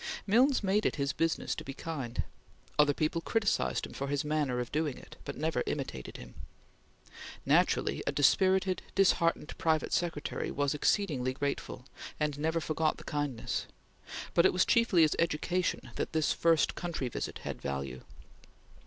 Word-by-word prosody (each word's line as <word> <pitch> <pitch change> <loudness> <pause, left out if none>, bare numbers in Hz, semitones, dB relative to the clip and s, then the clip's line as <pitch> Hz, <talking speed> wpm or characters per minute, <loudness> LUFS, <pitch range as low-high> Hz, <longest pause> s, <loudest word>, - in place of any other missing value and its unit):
Milnes 250 +5 +4
made 200 +2 +2
it - - -2
his 140 -1 -1
business 165 0 0
to - - -6
be 135 - -7
kind. 135 -8 -4 0.6
Other 150 -1 +6
people 155 +3 -1
criticised 220 +2 0
him - - -11
for 140 - -4
his 145 +1 -1
manner 150 -5 0
of 120 -1 -4
doing 150 -3 -1
it, - - -13
but - - -5
never 160 +1 0
imitated 130 - -4
him. - - -11 1.1
Naturally, - - +2
a - - +3
dispirited, 185 +5 +3
disheartened 170 -5 +2
private 160 -2 +1
secretary 165 -4 -1
was 145 0 0
exceedingly 145 -5 +1
grateful, 140 -2 -3 0.3
and 150 -2 -1
never 160 +2 +1
forgot 155 0 0
the - - -11
kindness, 145 -5 -2 0.7
but 170 - +5
it - - +4
was 180 - +3
chiefly 230 -8 +4
as 155 - +3
education 170 +2 0
that - - -2
this 160 -1 +2
first 165 -2 +3
country 170 -7 -3
visit 120 - -4
had - - -5
value. 70 -2 -4
155 Hz, 155 wpm, -31 LUFS, 140-175 Hz, 1.1 s, Other